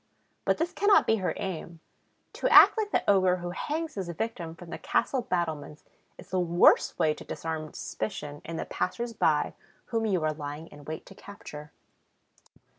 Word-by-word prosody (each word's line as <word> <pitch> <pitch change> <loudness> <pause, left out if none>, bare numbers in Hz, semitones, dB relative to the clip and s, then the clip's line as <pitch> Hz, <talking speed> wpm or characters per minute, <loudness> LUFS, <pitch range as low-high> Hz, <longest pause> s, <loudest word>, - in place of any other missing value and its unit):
But - - +2
this 345 +3 -1
cannot 405 +1 +5
be 225 - +3
her 185 -3 -1
aim. 170 -4 -5 0.5
To - - 0
act - - +9
like 435 -2 -1
the - - 0
ogre 185 -2 +4
who 175 -1 -5
hangs 310 - -3
his 190 -4 -4
victim 170 -2 -4
from 170 0 -12
the - - -5
castle 265 - 0
battlements 160 - -3 0.3
is 175 0 -14
the 185 - +1
worst 175 0 +4
way 155 - +3
to - - -11
disarm 160 -1 -5
suspicion 145 -7 -5
in 165 - -6
the - - -3
passers 235 +5 -3
by - - +2 0.4
whom 225 -1 +1
you 185 -6 +1
are 155 0 +1
lying 150 +1 -6
in 145 -1 -14
wait 155 +1 -6
to - - -13
capture. 150 -7 -10
175 Hz, 180 wpm, -28 LUFS, 155-220 Hz, 0.5 s, act